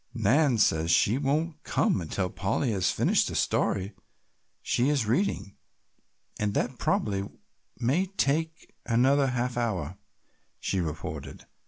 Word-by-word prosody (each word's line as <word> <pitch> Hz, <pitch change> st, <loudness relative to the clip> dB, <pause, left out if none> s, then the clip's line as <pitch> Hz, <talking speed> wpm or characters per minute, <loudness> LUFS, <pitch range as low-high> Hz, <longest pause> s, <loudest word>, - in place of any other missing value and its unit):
"Nan 125 Hz, +4 st, +3 dB
says 80 Hz, -6 st, +2 dB
she 110 Hz, +8 st, +3 dB
won't 155 Hz, +3 st, -1 dB
come 95 Hz, -, +1 dB
until 90 Hz, +3 st, -2 dB
Polly 110 Hz, +5 st, -1 dB
has 95 Hz, -4 st, +1 dB
finished -, -, +2 dB
the -, -, -5 dB
story 100 Hz, +1 st, 0 dB, 0.7 s
she 125 Hz, +4 st, +1 dB
is 140 Hz, -6 st, +1 dB
reading, 115 Hz, -, -1 dB, 0.8 s
and 105 Hz, -1 st, -1 dB
that 125 Hz, -1 st, -1 dB
probably 100 Hz, -1 st, 0 dB, 0.5 s
may 135 Hz, +11 st, +1 dB
take 160 Hz, -3 st, -1 dB
another 135 Hz, +4 st, +3 dB
half 125 Hz, -1 st, -2 dB
hour," 95 Hz, -7 st, -2 dB, 0.6 s
she 95 Hz, -, -1 dB
reported. 80 Hz, -3 st, -6 dB
120 Hz, 125 wpm, -27 LUFS, 100-140 Hz, 0.8 s, Nan